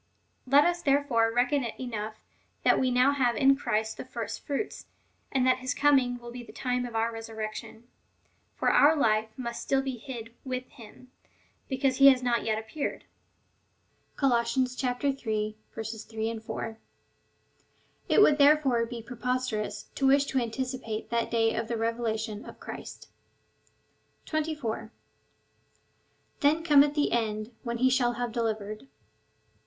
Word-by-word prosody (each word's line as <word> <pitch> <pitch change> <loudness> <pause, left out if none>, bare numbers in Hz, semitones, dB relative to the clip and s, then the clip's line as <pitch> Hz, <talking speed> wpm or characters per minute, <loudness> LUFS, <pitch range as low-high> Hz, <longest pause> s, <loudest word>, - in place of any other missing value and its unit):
Let 280 +3 +6
us 350 0 +1
there 280 -2 +3
fore 230 -5 +2
reckon 250 +4 +2
it 235 - -6
enough, 220 -4 -4 0.5
that - - +4
we 260 - +2
now 250 +2 +4
have 255 -4 +1
in 270 +4 +5
Christ 220 -5 -1
the - - -5
first - - -6
fruits,^ 290 +8 -3 0.4
and 260 -2 +2
that 255 0 +3
his 255 +2 -2
coming^ 265 -4 +3
will 240 0 -9
be 245 0 -7
the 240 - -12
time 250 -1 -2
of 235 - -9
our 225 +1 0
resur 225 0 -8
rection. 215 +1 -6 0.7
For - - +2
our 300 +3 +6
life 220 -6 +2
must 235 -2 -4
still 270 0 +1
be 265 -2 -3
hid 230 -2 -8
with 255 -1 -4
him, 250 +2 -15 0.6
because 265 -1 +1
he 275 - +8
has 260 -2 +6
not 240 -1 +1
yet 220 -1 0
appeared. 220 +7 -4 1.1
(Col. 275 -2 +2
iii. 235 +2 +1
3, 250 -4 -2 0.9
4.) 225 0 -5 1.3
It - - +5
would 295 - +5
therefore 280 -5 +4
be 235 -1 -7
preposterous 250 -2 -2
to 270 - +1
wish 275 +1 +5
to 270 -1 0
anticipate 245 -1 -4
that 235 -1 0
day 225 -1 +2
of 225 - -2
the 235 - -2
revela 230 0 -1
tion 220 -2 -5
of - - -11
Christ. - - -9 1.2
24. 295 -8 -3 1.5
Then 305 +3 +3
cometh 295 -2 +5
the 295 - +1
end, 215 -1 -1
when 235 -1 -3
he 255 +2 +3
shall 245 -2 +2
have 240 0 -3
delivered. 215 - -3
245 Hz, 150 wpm, -28 LUFS, 225-270 Hz, 1.5 s, he